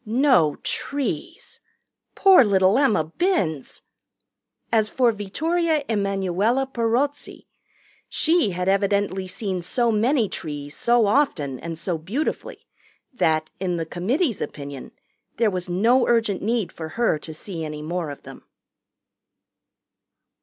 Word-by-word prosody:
No 230 - +3
trees. 285 -1 -4 0.6
Poor 385 -7 +7
little 195 +1 +3
Emma 240 - +3
Binns! 160 - -2 0.9
As 220 -2 +2
for 245 -1 +3
Vittoria 310 - -1
Emanuella 200 +3 0
Perozzi, 265 +3 -2 0.6
she 325 -8 +2
had 180 0 -3
evidently 195 -1 +1
seen 185 -1 -3
so 235 +7 0
many 230 +2 +2
trees 145 -4 -6
so 235 -1 +3
often 170 - +1
and 165 -1 -6
so 170 0 -2
beautifully 220 - -4 0.5
that, 155 -8 +1
in 180 -2 -1
the 165 - -2
committee's 230 - -1
opinion, 140 -2 -7 0.5
there 225 -2 +2
was 180 -1 -4
no 230 +8 +3
urgent 225 -5 +1
need 225 -2 -1
for 160 -1 -7
her 235 -10 +2
to 160 - -8
see 165 +1 -7
any 150 -1 -6
more 170 0 -3
of 140 - -9
them. - - -12
200 Hz, 120 wpm, -23 LUFS, 170-245 Hz, 0.9 s, Poor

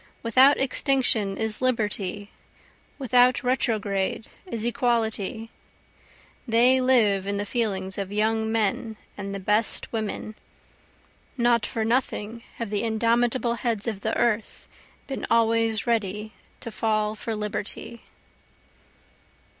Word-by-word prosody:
Without 255 +5 +5
extinction 255 -7 +1
is 220 0 -2
Liberty, 210 -5 -1 0.7
without 250 -2 +3
retrograde 220 -6 0 0.2
is 230 -9 -3
Equality, 230 -3 -1 1.0
They 245 +3 +4
live 215 -7 +3
in 200 0 -1
the 205 - -2
feelings 200 -5 -2
of 195 -1 -4
young 220 +1 0
men 220 0 -1 0.2
and 200 -1 -5
the - - -4
best 210 +5 0
women, 215 -1 -3 1.0
(Not 235 -2 +2
for 220 -1 -2
nothing 230 -2 -1
have 230 -3 -5
the 205 - 0
indomitable 235 +2 +1
heads 230 -4 -2
of 215 -4 -3
the 220 - -1
earth 225 -2 -1 0.4
been 270 - -5
always 225 -1 +2
ready 215 -2 -1 0.3
to 230 - -5
fall 215 -1 0
for 220 +1 -4
Liberty.) 210 +2 -4
225 Hz, 115 wpm, -25 LUFS, 210-235 Hz, 1.0 s, Without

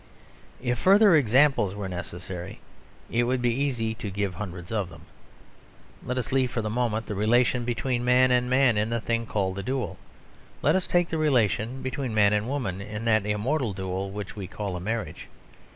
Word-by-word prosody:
If 120 -1 -1
further 200 -1 +6
examples 130 -6 +3
were 100 -1 -4
necessary, 90 0 -7 0.5
it 120 +1 +2
would 130 +1 0
be 120 -1 +1
easy 120 -4 -1
to 110 -2 -6
give 100 -1 -2
hundreds 90 -1 -7
of 105 -5 -1
them. 80 -3 -14 1.0
Let 125 +1 -3
us 125 - -3
leave, 130 -1 +2
for 115 -2 -3
the 105 - -2
moment, 115 -2 -1
the 105 - -4
relation 120 +4 +2
between 120 +1 -1
man 125 +1 +4
and 125 0 +2
man 130 -4 +4
in 105 +1 0
the 115 0 0
thing 115 +1 -2
called 95 -3 -1
the - - -2
duel. 130 +5 -3 0.6
Let - - +4
us 190 - 0
take 175 -1 +2
the 160 - -1
relation 125 - +1
between 130 -3 -3
man 105 -1 +4
and 105 +1 0
woman, 120 -9 -3
in 105 +2 -6
that 110 -3 +2
immortal 115 +3 0
duel 95 0 -3
which 100 0 -6
we 100 -3 -6
call 100 0 -4
a - - -4
marriage. 110 +5 -4
115 Hz, 190 wpm, -26 LUFS, 100-125 Hz, 1.0 s, further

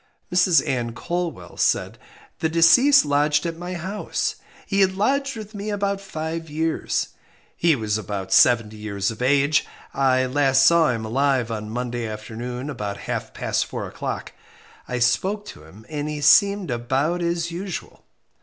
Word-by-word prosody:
Mrs 180 -1 +4
Ann 120 -3 -1
Colwell 170 - -4
said - - 0 0.4
The 160 - 0
deceased 170 - +6
lodged 145 +1 +2
at 165 -1 -2
my 175 +2 -6
house. 190 +5 -3 0.3
He 200 -1 +1
had 190 -1 +3
lodged 275 +6 0
with 215 0 -9
me 205 +1 -5
about 200 -1 -1
five 165 -3 -5
years. 160 +2 -1 0.5
He 165 -2 +3
was 110 -3 -1
about 95 -2 -4
seventy 115 -3 +4
years 100 -1 -2
of 115 - -9
age. 140 +3 +3 0.3
I 130 -1 +2
last 135 0 +3
saw 170 -2 +5
him 115 -2 -2
alive 130 0 +1
on 105 -1 -4
Monday 120 0 -3
afternoon 115 +4 -6
about 105 -8 -4
half - - -4
past - - -1
four - - -5
o'clock. - - -5 0.6
I 125 - -3
spoke 190 - +1
to 75 - -12
him, 100 +7 -15
and 150 -1 -4
he 150 -1 -4
seemed 200 +3 +4
about 135 +9 -1
as 170 0 -1
usual. 180 +1 -6
145 Hz, 155 wpm, -23 LUFS, 120-175 Hz, 0.6 s, deceased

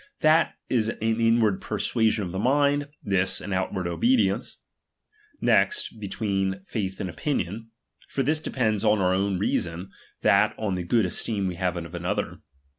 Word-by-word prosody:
That 155 +2 +4
is 115 -3 +1
an - - -4
inward 115 -2 +2
persuasion 110 -2 0
of 90 - -5
the 95 - -3
mind, 145 +4 +2
this 95 -2 +1
an 100 - -5
out 95 0 -1
ward 95 -2 -3
obedience. 100 +5 +1 0.8
Next, 425 - +2
between 100 -2 -1 0.2
y«///i 105 -5 0
and 95 - -2
opinion; 110 - -3 0.4
for 135 - -1
this 155 +4 +1
depends 110 -8 0
on 105 -1 +3
our 90 -1 +2
o^vn 95 0 +1
reason, 90 -2 -2 0.3
that - - +4
on 105 -3 -1
the 90 - -2
good 105 +5 +2
esteem 100 +2 -2
we 90 - -1
have 90 -1 -1
of 85 0 -7
another. 85 0 -2
105 Hz, 160 wpm, -26 LUFS, 95-115 Hz, 0.8 s, That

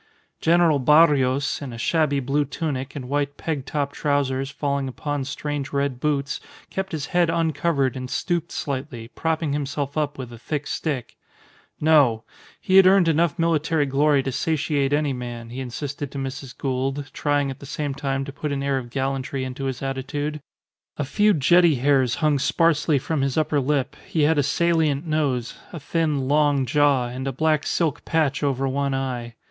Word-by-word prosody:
General 165 -3 +4
Barrios, 140 -1 +3
in 140 -3 -6
a 115 - -8
shabby 145 +3 +1
blue 140 +3 +1
tunic 140 -2 -4
and 130 -3 -6
white 145 +1 -1
peg 145 -5 -3
top 145 -1 -2
trousers 135 -2 0
falling 140 -1 -2
upon 145 +1 -3
strange 145 0 -4
red 140 -3 -1
boots, 140 0 -1 0.3
kept 190 0 -3
his 150 -3 -3
head 175 -2 +3
uncovered 155 -4 +1
and 130 -1 -5
stooped 170 +1 -1
slightly, 130 -4 -4
propping 160 -1 -1
himself 145 -1 -3
up 150 -2 -1
with 125 -3 -7
a 115 - -11
thick 150 +4 -3
stick. 140 -7 -3 0.6
No! 145 -8 +4 0.4
He 190 - +3
had 190 -1 +8
earned 190 -2 +5
enough 165 +1 +2
military 160 -2 +1
glory 140 +1 +2
to 135 - -2
satiate 145 -1 0
any 145 -1 +1
man, 120 -2 -6
he 125 - -6
insisted 140 +3 -5
to - - -7
Mrs. 135 -1 -6
Gould, 135 +1 -2
trying 145 -2 0
at 135 - -9
the 140 - -10
same 145 0 -3
time 135 -1 -2
to 140 - -8
put 150 +1 -4
an 140 -1 -2
air 140 -1 +1
of 120 -2 -9
gallantry 135 +1 -2
into 130 +1 -5
his 130 0 -3
attitude. 145 +3 -3 0.6
A 145 - -1
few 210 +9 +3
jetty 170 0 +4
hairs 130 -2 +2
hung 150 -2 +1
sparsely 155 +1 +2
from 145 +2 -1
his 135 +1 -1
upper 155 -1 +2
lip, 140 -1 0
he 155 - +1
had 155 0 +3
a - - +5
salient 160 -1 +1
nose, 140 -7 -1
a 170 - -6
thin, 150 -3 -1
long 145 -1 +3
jaw, 145 -2 +3
and 130 +2 -5
a - - 0
black 155 +3 +1
silk 155 -4 0
patch 155 -4 0
over 135 -2 0
one 140 0 -1
eye. 125 -3 -4
140 Hz, 180 wpm, -23 LUFS, 135-155 Hz, 0.6 s, had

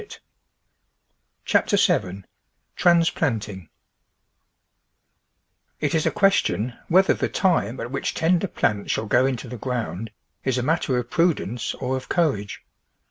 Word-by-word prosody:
CHAPTER 205 - +2
SEVEN 100 - +1 0.5
TRANSPLANTING 125 - +1 2.1
IT 150 -2 -1
is 160 -2 +1
a - - +4
question 160 - +1
whether 190 +3 +4
the - - -2
time 170 - +1
at 120 - -5
which 135 - -3
tender 175 +3 +2
j^lants 105 - -1
shall 110 - -1
go 125 +4 +3
into 130 -2 -3
the 125 +1 -7
ground 115 -3 -4 0.3
is 130 -1 0
a 125 - -1
matter 145 -3 0
of 120 -1 -4
pru 170 -1 +3
dence 115 +3 -4
or 130 0 -2
of 130 - -9
courage. 140 - -1
130 Hz, 130 wpm, -23 LUFS, 115-165 Hz, 2.1 s, a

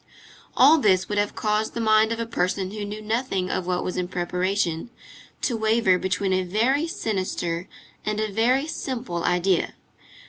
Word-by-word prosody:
All 300 +5 +7
this 190 -6 +3
would 205 0 0
have 205 0 -1
caused 215 0 -1
the - - -2
mind 220 0 +4
of 230 - -2
a 230 - -1
person 190 -3 -1
who 210 0 -5
knew 210 +1 -6
nothing 215 -4 -1
of 180 - -2
what 180 -1 0
was 180 - -3
in 180 -1 -1
preparation, 180 +1 -1 0.5
to 245 - +1
waver 220 -4 +3
between 190 +1 0
a 185 - +2
very 235 - +1
sinister 185 - -3 0.3
and 215 0 -2
a 215 -1 -1
very 245 +7 +2
simple 250 - -4
idea. 180 0 +1
205 Hz, 170 wpm, -24 LUFS, 185-225 Hz, 0.5 s, All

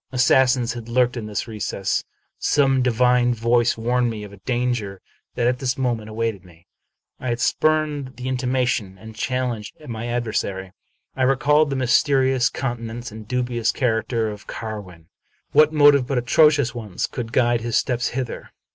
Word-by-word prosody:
Assassins 125 -1 +3
had 120 -1 -8
lurked 125 +1 +2
in 115 -3 -5
this 105 +1 -3
recess. 105 -3 -2 0.4
Some 135 -2 +2
divine 125 0 +3
voice 120 +1 +2
warned 120 +2 +1
me 110 -2 -5
of 100 -2 -12
danger 120 -6 -1 0.4
that 120 - 0
at 125 +1 +1
this 130 -2 -1
moment 120 -5 -2
awaited 110 -3 -3
me. 85 -1 -19 0.5
I 130 - -6
had 120 0 -1
spurned 150 -3 0
the 125 +2 -6
intimation, 125 -6 -1
and 110 +3 -12
challenged 120 -2 -3
my 115 0 -5
adversary. 110 -6 -2 0.4
I 130 - -4
recalled 145 +3 +3
the 135 - -2
mysterious 130 0 +3
countenance 120 -2 -5
and 110 0 -10
dubious 120 -1 0
char 115 -4 0
acter 110 -1 -2
of 105 0 -13
Carwin. 100 -7 -7 0.5
What 155 +1 +5
motive 145 -4 +5
but 135 - -1
atrocious 140 +1 +3
ones 110 -6 -4
could 115 -3 -6
guide 120 -1 +2
his 115 0 0
steps 125 -2 0
hither? 125 -1 -5
120 Hz, 155 wpm, -22 LUFS, 110-130 Hz, 0.5 s, What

